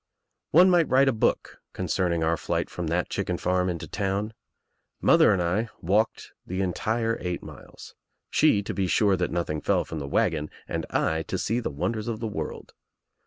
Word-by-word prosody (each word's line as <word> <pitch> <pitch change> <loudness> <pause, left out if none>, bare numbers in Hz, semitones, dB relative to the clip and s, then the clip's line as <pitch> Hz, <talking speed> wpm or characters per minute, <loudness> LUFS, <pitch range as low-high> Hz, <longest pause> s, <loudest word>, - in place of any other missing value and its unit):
One 180 +4 +7
might 175 -3 +3
write 135 +1 +5
a - - +5
book 110 - -1
concerning 85 -3 0
our 80 +1 +2
flight - - -2
from 90 -2 -4
the 85 +3 0
chicken - - -2
farm 90 0 0
into 85 -2 -4
town. 100 +2 -2 0.7
Mother - - +5
and 90 -3 +1
I 100 +7 0
walked 105 +6 0
the 95 +1 -5
entire 115 +5 -1
eight 90 -1 -3
miles - - -12 0.2
— - - -54
she 100 - +4
to - - -4
be 95 -2 0
sure 100 +1 +3
that 90 -1 -1
nothing 85 -3 -2
fell - - +1
from 80 - -6
the 70 - -5
wagon 75 +1 0 0.2
and - - -3
1 80 0 0
to - - -3
see 115 +3 0
the 120 - -3
wonders 95 +10 -3
of 115 -2 -3
the 115 - -3
world. 105 - -6
95 Hz, 190 wpm, -26 LUFS, 85-110 Hz, 0.7 s, One